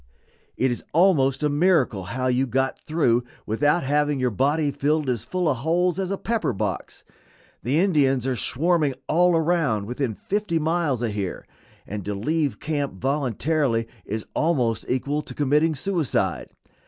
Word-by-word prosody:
It 130 0 +2
is 120 - -4
almost 150 -6 +3
a - - +4
miracle 145 - +2
how 125 +7 -3
you 130 +1 +2
got 130 +2 0
through 125 -7 +1 0.2
without 145 +10 +1
having 145 +1 +1
your 125 -1 +1
body 145 +6 +1
filled 150 +1 0
as 120 -4 -1
full 180 +7 -1
of 140 - +1
holes 175 +6 +1
as 190 -1 -1
a 195 - -1
pepper 225 - -1
box. 100 -3 -4 0.6
The 135 +8 +1
Indians 140 - +2
are 130 -1 0
swarming 150 +2 +1
all 175 +2 +3
around 160 - +1
within 125 0 -2
fifty 200 - -1
miles 160 -6 0
of 115 - 0
here, 100 -3 -4 0.4
and 105 -1 -5
to 105 0 -2
leave 150 +7 -1
camp 145 -3 -2
voluntarily 135 0 0 0.2
is 110 +1 -4
almost 125 -9 0
equal 140 +4 0
to - - -10
committing 150 +3 +2
suicide. 165 0 -1
145 Hz, 155 wpm, -24 LUFS, 125-160 Hz, 0.6 s, a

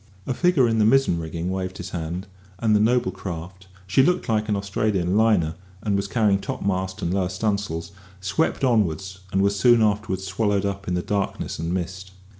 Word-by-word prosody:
A - - -1
figure 170 -4 +3
in 115 -1 +1
the - - +5
mizzen 120 -6 +4
rigging 85 +2 -4
waved 95 0 -3
his 90 +2 -7
hand, 85 +2 -4 0.3
and 110 0 +2
the - - +4
noble 120 +3 +2
craft 95 +1 -7 0.2
(she 95 +8 +3
looked 180 +6 +2
like 110 -1 0
an 105 - +2
Australian 100 -2 0
liner, 105 -8 +3 0.3
and 105 -2 +1
was 100 0 -1
carrying 105 -2 +2
topmast 95 0 -2
and 85 - 0
lower 95 -2 0
stunsails) 95 -3 -2 0.3
swept 95 +7 0
onward, 105 - +2 0.3
and 95 +1 +2
was 100 0 +1
soon 120 0 +5
afterwards 105 -3 0
swallowed 100 +1 0
up 100 -1 -3
in 90 - 0
the 90 - -1
darkness 100 -5 -2
and 80 +1 -2
mist. 95 +1 -4
100 Hz, 190 wpm, -24 LUFS, 90-110 Hz, 0.3 s, the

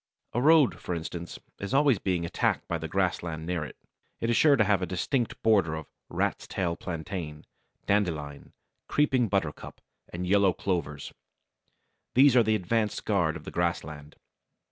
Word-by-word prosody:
A 120 - 0
road, 155 -1 +5
for 90 - -4
instance, 85 +1 -6 0.2
is 100 +7 -3
always 140 -5 +4
being 90 -3 -1
attacked 85 - -1
by 85 - -2
the 80 - -4
grassland 85 -3 -1
near 85 -2 -2
it. - - -9 0.4
It 115 - 0
is - - +2
sure 145 +4 +6
to 115 - +4
have 100 -2 +2
a 90 - -2
distinct 115 - -1
border 100 -8 +3
of 80 -1 -6 0.2
Rat's - - -2
Tail 85 -2 -2
Plantain, 80 -3 -6 0.4
Dandelion, 80 -8 -1 0.3
Creeping 130 -5 +2
Buttercup, 95 -7 -3 0.3
and 90 +1 -4
Yellow 100 0 +4
Clovers. 80 -8 -3 1.0
These 135 0 +6
are 125 - +7
the 110 -1 +2
advanced 105 +2 -1
guard 90 -6 +1
of - - -8
the - - -8
grassland. 80 -4 -3
90 Hz, 160 wpm, -28 LUFS, 80-110 Hz, 1.0 s, are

